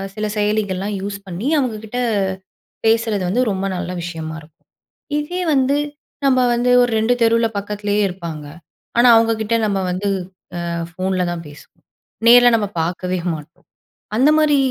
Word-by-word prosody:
சில 215 - -2
செயலிகள்லாம் 205 -1 -1
யூஸ் 200 0 -5
பண்ணி 185 +7 -4
அவங்க 250 -5 -1
கிட்ட 245 +3 -4 0.9
பேசறது 225 -3 +2
வந்து 240 +7 +1
ரொம்ப 190 0 -2
நல்ல 180 0 -4
விஷயமா 165 -2 -5
இருக்கும். 150 0 -22 0.5
இதே 350 +5 -4
வந்து 270 0 +2 0.5
நம்ப 255 -2 +4
வந்து 240 +1 +1
ஒரு 245 -1 +2
2 220 +3 +2
தெருவுல 230 0 +4
பக்கத்திலேயே 205 +1 -1
இருப்பாங்க. 170 -5 -6 0.5
ஆனா 240 +1 +6
அவங்க 225 0 +4
கிட்ட 225 +2 0
நம்ம 200 -2 0
வந்து 195 +3 -2 0.6
அ - - -3 0.2
ஃபோன்ல 185 +1 -1
தான் 170 -1 -6
பேசுவோம். 145 0 -16 0.5
நேர்ல 245 0 +8
நம்ம 210 -2 -1 0.2
பார்க்கவே 180 +2 -2 0.2
மாட்டோம். 155 +1 -12 0.5
அந்த 265 +5 +5
மாரி 305 -2 +4
205 Hz, 145 wpm, -19 LUFS, 180-235 Hz, 0.9 s, நேர்ல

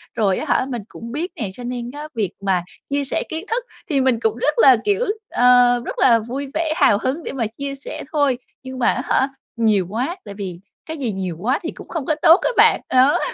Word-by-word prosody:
rồi 200 -5 +2
á - - -3
hả - - -1
mình 240 -4 -3
cũng 230 0 -9
biết 325 +8 -3
nè, 215 -6 -3
cho 245 - -10
nên 245 0 -4
á 295 +2 -7
việc 210 -5 -1
mà 190 -3 +1 0.3
chia 280 0 0
sẻ 275 - -1
kiến 320 +4 -5
thức 465 +2 -1 0.3
thì 280 -4 +2
mình 260 -3 +2
cũng 220 -1 0
rất 295 +5 +1
là, 260 -3 +7
kiểu, 410 +4 +2 0.2
ờ, 245 0 +5
rất - - -5
là 235 -3 +5
vui 255 +6 -5
vẻ 320 0 0
hào 205 - +4
hứng 280 +6 -2
để - - -4
mà 250 -4 -2
chia 275 +5 -6
sẻ 270 - -8
thôi, 285 -5 +2 0.3
nhưng 260 0 -7
mà 240 - +2
á - - -3
hả 265 - +2 0.3
nhiều 215 -5 +2
quá, 250 - -2
tại 205 - -8
vì 190 -4 -6 0.3
cái 320 0 -6
gì 255 -6 -2
nhiều 185 -4 -4
quá 255 - 0
thì 330 - -3
cũng - - -12
không 320 -6 -4
có 310 - +1
tốt 330 +4 +7
á - - +1
bạn. 445 +2 +5
Đó. 260 +3 +4
255 Hz, 245 wpm, -20 LUFS, 225-290 Hz, 0.3 s, là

